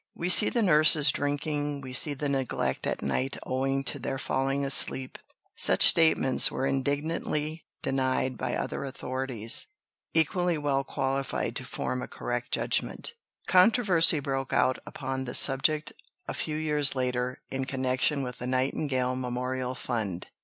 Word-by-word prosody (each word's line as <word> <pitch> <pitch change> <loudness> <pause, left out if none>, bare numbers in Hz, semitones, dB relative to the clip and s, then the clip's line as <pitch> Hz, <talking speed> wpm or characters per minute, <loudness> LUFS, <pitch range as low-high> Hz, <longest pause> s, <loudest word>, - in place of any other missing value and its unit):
We 175 - -3
see 210 - +7
the 235 - 0
nurses 155 -4 +5
drinking, 145 0 -2
we 130 -1 -8
see 145 +3 +3
the 145 +2 -3
neglect 135 -3 -2
at - - -3
night 130 - -2
owing 135 +1 -1
to 125 - -3
their 135 - -4
falling 135 +1 -1
asleep." 135 -1 +1 0.4
Such - - +5
statements 160 -5 +5
were 130 - -3
indignantly 150 +3 -2 0.2
denied 130 -1 0
by - - -3
other - - -4
authorities, 130 -4 -3 0.5
equally 175 +1 +1
well 140 -2 0
qualified 135 0 -3
to - - -4
form 125 - -4
a - - -6
correct 120 0 -5
judgment. - - -2 0.3
Controversy 185 -5 +5
broke 135 -1 -3
out 130 0 +2
upon 130 0 -5
the 120 - -4
subject 150 +3 +3 0.3
a - - -3
few 155 -1 -3
years 150 -3 0
later 125 -1 -2
in 135 0 -2
connection 130 +2 0
with 125 -1 -7
the 125 - -5
Nightingale 130 0 -1
Memorial 125 0 -3
Fund. 110 -8 -4
135 Hz, 145 wpm, -27 LUFS, 130-150 Hz, 0.5 s, see